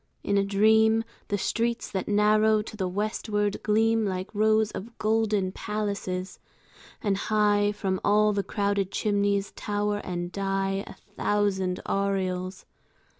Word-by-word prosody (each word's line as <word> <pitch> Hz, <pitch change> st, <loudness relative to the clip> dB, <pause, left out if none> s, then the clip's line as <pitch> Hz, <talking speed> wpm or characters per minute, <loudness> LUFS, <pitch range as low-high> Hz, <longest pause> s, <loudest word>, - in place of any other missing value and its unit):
In 200 Hz, -, 0 dB
a 200 Hz, -, +3 dB
dream 220 Hz, +3 st, +4 dB, 0.2 s
The 205 Hz, -, 0 dB
streets 230 Hz, +4 st, -1 dB
that 190 Hz, -2 st, -3 dB
narrow 215 Hz, +1 st, +3 dB
to 215 Hz, -, -9 dB
the 190 Hz, -3 st, -2 dB
westward 205 Hz, +1 st, -1 dB
gleam 225 Hz, +1 st, +2 dB
Like 185 Hz, -1 st, -3 dB
rows 215 Hz, 0 st, +3 dB
of 225 Hz, +4 st, -8 dB
golden 215 Hz, -3 st, +1 dB
palaces; 200 Hz, -3 st, -4 dB, 0.6 s
and 200 Hz, -3 st, +1 dB
high 205 Hz, 0 st, +2 dB
From 190 Hz, -3 st, -2 dB
all 210 Hz, +1 st, +4 dB
the 200 Hz, -, +1 dB
crowded 200 Hz, -1 st, -1 dB
chimneys 200 Hz, -1 st, 0 dB
tower 205 Hz, 0 st, -2 dB
and 175 Hz, -1 st, -4 dB
die 195 Hz, 0 st, -1 dB
A -, -, -9 dB
thousand 200 Hz, -3 st, -1 dB
aureoles. 190 Hz, -2 st, -2 dB
205 Hz, 130 wpm, -27 LUFS, 195-215 Hz, 0.6 s, dream